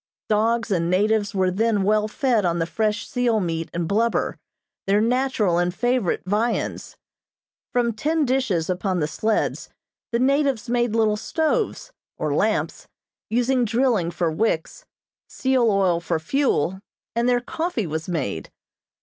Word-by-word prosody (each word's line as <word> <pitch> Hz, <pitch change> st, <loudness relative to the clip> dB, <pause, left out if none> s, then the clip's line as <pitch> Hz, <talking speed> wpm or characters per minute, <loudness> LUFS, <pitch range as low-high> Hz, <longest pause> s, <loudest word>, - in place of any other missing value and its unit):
Dogs 225 Hz, +2 st, +1 dB
and 170 Hz, -3 st, +1 dB
natives 205 Hz, +2 st, +1 dB
were 185 Hz, -1 st, +2 dB
then 210 Hz, +1 st, +1 dB
well 210 Hz, +1 st, +2 dB
fed 240 Hz, -2 st, +1 dB
on 170 Hz, -1 st, +1 dB
the 165 Hz, -, 0 dB
fresh 215 Hz, +4 st, -1 dB
seal 245 Hz, -3 st, +1 dB
meat 165 Hz, -3 st, -2 dB
and 170 Hz, -1 st, -2 dB
blubber, 225 Hz, +5 st, +1 dB, 0.5 s
their 200 Hz, +1 st, +3 dB
natural 230 Hz, -6 st, +1 dB
and 175 Hz, 0 st, +1 dB
favorite 245 Hz, 0 st, 0 dB
viands. 215 Hz, +5 st, -1 dB, 0.7 s
From 240 Hz, -2 st, +1 dB
tin 305 Hz, +7 st, 0 dB
dishes 245 Hz, -11 st, 0 dB
upon 185 Hz, 0 st, -1 dB
the 150 Hz, -, +1 dB
sleds, 215 Hz, +8 st, -1 dB, 0.4 s
the 235 Hz, -, +1 dB
natives 270 Hz, -2 st, +1 dB
made 240 Hz, -2 st, 0 dB
little 215 Hz, -2 st, +2 dB
stoves, 330 Hz, -, -1 dB, 0.3 s
or -, -, -1 dB
lamps, -, -, 0 dB, 0.4 s
using 245 Hz, +2 st, +2 dB
drilling 230 Hz, -6 st, +1 dB
for 170 Hz, -1 st, -1 dB
wicks, 165 Hz, -2 st, -1 dB, 0.4 s
seal 260 Hz, -3 st, +1 dB
oil 190 Hz, -4 st, +2 dB
for 170 Hz, -1 st, -1 dB
fuel, 190 Hz, -, 0 dB, 0.4 s
and 235 Hz, +1 st, +2 dB
their 245 Hz, -1 st, +3 dB
coffee 315 Hz, -, -3 dB
was 160 Hz, +1 st, -4 dB
made. 130 Hz, -, -3 dB
215 Hz, 140 wpm, -23 LUFS, 180-245 Hz, 0.7 s, their